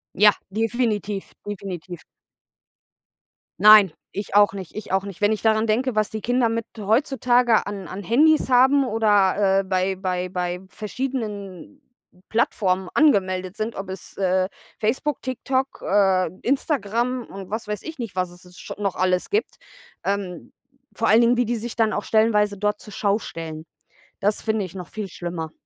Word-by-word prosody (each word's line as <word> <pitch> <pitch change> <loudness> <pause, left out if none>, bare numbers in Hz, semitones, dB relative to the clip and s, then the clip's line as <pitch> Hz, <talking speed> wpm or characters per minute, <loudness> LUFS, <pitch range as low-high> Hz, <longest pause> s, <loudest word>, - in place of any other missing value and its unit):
Ja, 210 +2 +7 0.2
definitiv, 215 -2 -1 0.2
definitiv. 185 -3 -6 1.6
Nein, 210 -3 +8 0.2
ich 200 0 -5
auch 205 -1 +6
nicht, 190 -4 -8
ich 215 -3 -7
auch 190 0 +1
nicht. 200 -3 -8
Wenn 205 +1 +3
ich 215 - -1
daran 220 0 +3
denke, 235 +2 0
was 215 -1 +1
die 220 -1 -5
Kinder 245 0 +2
mit 230 0 -2
heutzutage 240 +1 +2
an 200 -3 -6
an 195 +2 -7
Handys 300 - +3
haben 265 +2 +5
oder, 205 -3 +3
äh, - - -8
bei 190 0 0
bei 185 -1 -2
bei 180 -1 -3
verschiedenen 215 - -5 0.5
Plattformen 190 -5 +1
angemeldet 185 - +2
sind, 220 +1 -3
ob 195 0 -6
es, 190 -1 -8
äh, 185 -1 +1 0.3
Facebook, 260 +6 -1
TikTok, 260 +1 -2
äh, 190 -3 +3
Instagram 250 -3 0
und 195 -1 -10
was 220 0 -4
weiß 210 -1 -3
ich 320 0 -8
nicht, 230 -7 -6
was 180 -1 -1
es 180 0 -16
scho - - -8
noch 195 -3 -1
alles 185 -1 +1
gibt. 425 +2 0 0.5
Ähm, 195 -4 -3 0.4
vor 225 - -1
allen 225 +3 +6
Dingen, 240 +1 +4
wie 245 - +2
die 240 +2 -1
sich 230 +1 -6
dann 220 -2 +2
auch 205 - -2
stellenweise 210 -2 +2
dort 210 +1 -1
zur 210 - -12
Schau 205 0 +1
stellen. 160 -3 -7 0.5
Das 205 +1 0
finde 220 -3 -1
ich 180 - -11
noch 180 -3 -7
viel 215 -2 -5
schlimmer. 170 -3 -5
210 Hz, 165 wpm, -23 LUFS, 190-230 Hz, 1.6 s, Nein